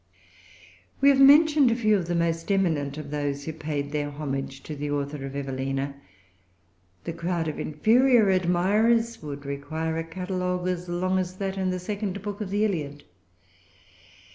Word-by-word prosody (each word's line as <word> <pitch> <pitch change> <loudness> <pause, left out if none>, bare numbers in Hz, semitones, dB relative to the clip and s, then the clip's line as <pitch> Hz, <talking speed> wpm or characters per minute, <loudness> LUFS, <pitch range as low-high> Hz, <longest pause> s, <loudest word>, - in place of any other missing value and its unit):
We 280 - +6
have 275 -1 +4
mentioned 295 0 +7
a 230 - +2
few 215 -3 +3
of 180 -4 -1
the 175 - -1
most 165 +2 0
eminent 155 -8 0
of 150 -2 -7
those 145 -1 -2
who 160 - -5
paid 150 -2 -4
their 145 -1 -2
homage 135 -2 -5
to 155 - -6
the 145 +1 -4
author 145 -1 -3
of 135 - -8
Evelina. 135 0 -3 1.1
The 165 - -4
crowd 170 0 -2
of 155 - -4
inferior 225 - +4
admirers 210 +6 +2
would 145 -1 -7
require 155 +4 -3
a - - -2
catalogue 180 +1 -3
as[Pg 180 -1 -2
352] - - -5
long 185 +2 +1
as 185 0 -3
that 195 0 -3
in 190 -1 -1
the 185 - -1
second 200 +1 -4
book 205 0 -5
of 205 - -4
the 205 +2 +1
Iliad. 145 -8 -3
170 Hz, 170 wpm, -26 LUFS, 145-200 Hz, 1.1 s, mentioned